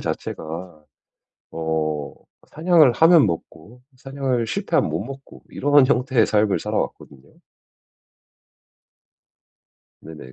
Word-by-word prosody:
자체가 80 0 -6 0.7
어 80 -2 -3 0.4
사냥을 160 -5 +4
하면 165 -1 +5
먹고 85 +6 -7
사냥을 130 -3 -3
실패하면 - - -1
못 80 +6 -3
먹고 135 +2 -12
이러한 145 -1 +3
형태의 130 -2 +2
삶을 105 -2 +1
살아왔거든요. 70 -2 -5 2.7
네네. 75 -5 -12
110 Hz, 215 characters per minute, -21 LUFS, -, 2.7 s, 하면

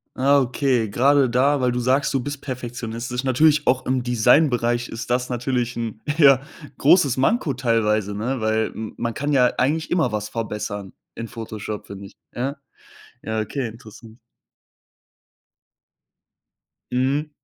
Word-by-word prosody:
Ah, 140 +2 +4
okay, 125 -3 0
gerade 135 +4 +3
da 135 +4 +2
weil 125 -1 +2
du 120 - -2
sagst, 130 +3 +1
du 135 - +2
bist 145 +2 -6
perfektionistisch 120 -1 -5
natürlich 145 +4 +3
auch 130 +1 +2
im 130 -1 0
Designbereich, 120 0 +2
ist 115 +1 -7
das 125 +1 0
natürlich 125 -1 -2
'n, 115 -2 -5 0.2
ja, 135 -4 +6 0.4
großes 140 -3 +4
Manko 150 - +1
teilweise, 110 -5 0
ne? 120 +5 -2
Weil 110 0 0
m 110 -1 -6
man 115 0 -2
kann 145 +4 -2
ja 125 -3 +3
eigentlich 155 +5 0
immer 160 -9 +2
was 105 -1 -3
verbessern 105 -3 -5 0.2
in 115 - -6
Photoshop, 110 -2 -7
finde 100 0 -9
ich, - - -19 0.2
ja? 135 +4 -2 0.7
Ja, 110 0 -2
okay, 120 +4 -3
interessant. 110 0 -13 2.7
Mhm. 135 +4 0
125 Hz, 140 wpm, -22 LUFS, 115-135 Hz, 2.7 s, ja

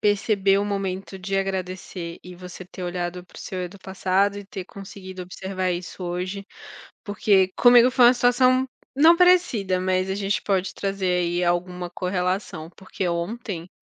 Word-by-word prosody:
perceber 200 -1 +2
o 200 - 0
momento 195 -1 -3
de 195 +1 -3
agradecer 185 -2 -4
e 180 0 -10
você 180 +1 -10
ter 185 +1 -10
olhado 175 0 -4
para - - -19
o - - -8
seu 185 -1 -5
eu 180 - -4
do 200 +2 -14
passado 195 +1 0
e 205 - -8
ter 190 -1 -7
conseguido 190 -1 -9
observar 185 +1 -3
isso 180 +1 -6
hoje, 185 +3 -4 0.6
porque 200 -2 +2
comigo 245 0 +7
foi 250 -1 +5
uma 240 - +8
situação, 255 +1 +3 0.3
não 320 +5 +6
parecida, 255 - +3
mas 185 0 0
a 190 - -1
gente 200 0 -1
pode 190 -2 -1
trazer 195 -2 -1
aí 175 +1 0
alguma 175 0 -1
correlação, 180 -2 -2
porque 190 0 -4
ontem 175 0 -4
190 Hz, 165 wpm, -24 LUFS, 180-200 Hz, 0.6 s, uma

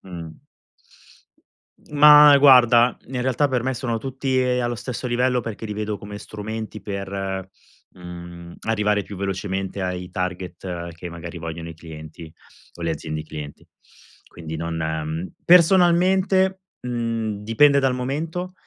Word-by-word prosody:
mhmm. 85 -4 -8 1.6
Ma 150 0 +9
guarda, 125 -3 +6
in 130 -1 -4
realtà 130 +3 +1
per 125 -3 -1
me 130 - -1
sono 120 -2 -2
tutti 130 +2 -2
e 125 0 +1
allo 120 -1 -1
stesso 120 +2 -5
livello 125 +1 +1
perché 115 -1 -6
li 105 - -4
vedo 105 0 -3
come 105 +1 -9
strumenti 110 0 -7
per, 95 -1 -4 0.5
mhmm, 85 -1 -10
arrivare 105 -2 +1
più 100 - -9
velocemente 95 0 -3
ai 90 0 -4
target 90 -1 -5
che 85 +2 -8
magari 85 +1 -8
vogliono 85 0 -6
i - - -8
clienti 80 0 -11 0.4
o 85 - -11
le 85 - 0
aziende 75 0 -5
clienti. 75 -2 -9 0.6
Quindi 80 -2 -8
non, 85 +1 -4
ehm, 80 +2 -3
personalmente, 185 +2 +4 0.2
mhmm, 115 -4 -3
dipende 140 +6 +4
dal 135 -2 +1
momento, 160 +8 -4
105 Hz, 135 wpm, -22 LUFS, 85-130 Hz, 1.6 s, Ma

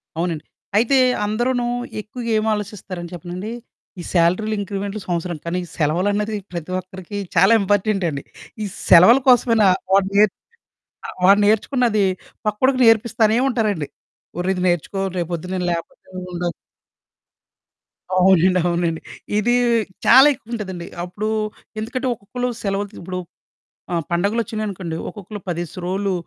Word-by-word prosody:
అవునండి. 165 -2 -2 0.3
అయితే 245 +5 +4 0.3
అందరూనూ 240 +4 0 0.4
ఎక్కువగా 235 +3 -7
ఏమాలోచిస్తారని 205 -5 -3
చెప్పనండీ, 180 +5 -6 0.5
ఈ - - -4
శాలరీలు, 185 +6 +2
ఇంక్రిమెంట్లు 200 +1 -4
సంవత్సరం 175 -1 -2
కానీ, 175 +2 -1 0.2
సెలవులన్నది 200 +7 0 0.2
ప్రతి 175 0 -6
ఒక్కరికి 185 +2 -8 0.2
చాలా - - +6
ఇంపార్టెంటండి. 195 -7 0 0.4
ఈ - - -1 0.2
సెలవుల 185 +10 +8
కోసమైనా 230 -4 +5 0.3
వాడు 195 0 +4
నేర్చ్ 210 -2 +4 0.7
ఆహ్, - - -8
వాడు 200 +2 +6
నేర్చుకున్నాదీ 220 0 +2 0.4
పక్కోడికి 255 +5 +2
నేర్పిస్తానే 225 0 +4
ఉంటారండి. 210 - -1 0.5
ఒర్రిది 180 0 -1
నేర్చుకో, 175 +3 -1 0.2
రేపొద్దున 175 +1 -3
నేను 180 -1 -1
లేపోతే 165 -1 -6 0.3
ఉండదు. 175 -1 -2 1.6
అవునండి. 185 0 +4
అవునండి. 170 -2 -1 0.4
ఇదీ 240 +4 +2 0.5
చాలా 270 +3 +8
ఎక్కువుంటదండి. 205 -8 -6 0.2
అప్పుడూ 200 +5 -4 0.5
ఎందుకంటే, 255 +4 -3
ఒక్కొక్కళ్ళు 245 +4 -4
సెలవులు 200 0 -1
త్ - - -16
ఇప్పుడు 180 +1 -5 0.7
ఆహ్, 170 -1 0
పండగలొచ్చినియనుకోండి, 200 -2 -2
ఒక్కొక్కళ్ళు 205 0 -9
పదేసి 175 0 -4
రోలు, 195 +1 -1
195 Hz, 110 wpm, -21 LUFS, 175-215 Hz, 1.6 s, సెలవుల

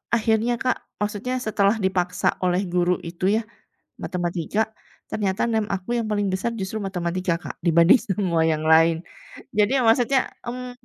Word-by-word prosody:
akhirnya 225 +1 +1
Kak, 255 - +1 0.2
maksudnya 210 +4 -2
setelah 200 0 +2
dipaksa 180 -1 0 0.2
oleh 180 +1 +2
guru 180 0 +3 0.2
itu 175 +2 -4
ya, - - 0 0.6
matematika, 175 +3 -2 0.5
ternyata 195 -3 -1
NEM 220 -1 +1
aku 185 +1 -8
yang 220 - -4
paling 205 -1 0
besar 210 +5 -1
justru 190 +3 -3
matematika 180 -1 -1
Kak, - - -6
dibanding 170 +8 +6
semua 180 -4 +1
yang 155 0 -2
lain. 165 0 +5 0.6
Jadi 210 +5 +3
maksudnya, 245 +3 +4 0.3
mmm 250 +1 -5
195 Hz, 145 wpm, -23 LUFS, 175-220 Hz, 0.6 s, dibanding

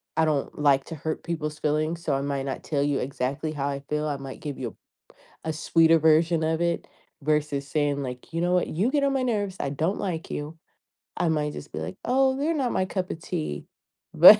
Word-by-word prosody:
I 160 - +4
don't 150 -3 0
like 140 -2 +4
to 165 - -6
hurt 155 +1 -3
people's 155 -2 -3
feelings, 155 +3 0
so 145 -5 +1
I 135 - 0
might 140 -1 -1
not 135 -1 -4
tell 145 -3 0
you 145 -1 +2
exactly 140 +4 -2
how 145 -2 -2
I 140 -1 -2
feel. 150 +2 -2
I 145 -2 -1
might 135 -1 -8
give 145 -3 -4
you 120 -4 -5 0.7
a 160 - 0
sweeter 165 +1 +5
version 160 +1 +4
of 160 0 +1
it, 170 -1 +1 0.4
versus 150 -1 +1
saying, 145 -2 +1
like, 125 +5 -7
"You 165 - 0
know 175 +1 +2
what, 180 - +3
you 200 +11 +1
get 285 -1 +2
on 275 - +2
my 265 -1 +1
nerves, 205 -6 0
I 140 - -1
don't 160 +7 0
like 170 -4 -3
you." 150 +2 -4 0.6
I 170 - +2
might 150 -2 0
just 145 - -8
be, - - -4
like, 185 - -5
"Oh, 265 +1 +3
they're 300 +4 +1
not 270 -6 0
my 185 - +1
cup 185 -1 -2
of 160 - -4
tea." 75 - -3 0.5
But, - - +11
155 Hz, 225 wpm, -26 LUFS, 140-170 Hz, 0.7 s, But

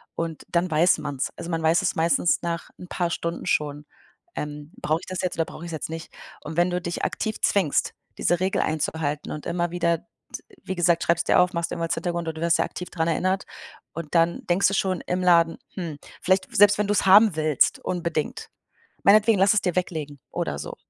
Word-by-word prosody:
Und 165 -2 -4
dann 175 +1 0
weiß 165 +3 +4
man's. 145 -3 -3
Also, 170 - -6
man 165 -1 -1
weiß 160 +1 +3
es - - 0
meistens 165 0 +2
nach 170 -1 -4
'n 180 - -9
paar 175 -1 -1
Stunden 170 0 -4
schon, 145 0 -1 0.5
ähm: 150 0 -6
„Brauche 155 +2 +1
ich - - -11
das 185 0 -3
jetzt 185 -1 -2
oder 165 0 0
brauch 165 - -10
ich's 170 - -6
jetzt 155 - -4
nicht?“ 165 +1 -7 0.3
Und 155 - -7
wenn 175 +1 +3
du 180 0 -2
dich 175 0 -4
aktiv 220 -1 -2
zwingst, 185 -8 +2 0.3
diese 175 - +2
Regel 190 +1 0
einzuhalten 155 -1 -2
und 150 - -6
immer 175 0 -1
wieder 170 -1 +1
d - - -29 0.6
wie 190 - -3
gesagt, 175 -1 +2
schreib's 165 -1 +2
dir - - +3
auf, 180 +1 +3
mach's 170 0 -1
irgendwo 170 - -3
als 165 - -1
Hintergrund 170 0 -3
und 160 - -3
du - - -7
wirst 170 0 +3
ja - - +3
aktiv 180 - -7
dran 160 -2 -1
erinnert 185 +3 0 0.5
und 165 0 -6
dann 170 0 +3
denkst 180 +3 +3
du 195 - 0
schon 185 -3 0
im 180 +1 -1
Laden: 170 -2 +4 0.2
„Hm“, 170 -6 -5 0.3
vielleicht 185 +1 +1
selbst 205 0 +6
wenn 210 - +1
du's 205 0 +1
haben 200 0 +7
willst, 155 -3 +2
unbedingt. 170 -4 -3 0.5
Meinetwegen, 215 +2 +5
lass 195 +2 +5
es 215 - +2
dir 180 -3 -1
weglegen 155 -6 -3
oder - - -3
so. - - -6
170 Hz, 215 wpm, -24 LUFS, 160-180 Hz, 0.6 s, haben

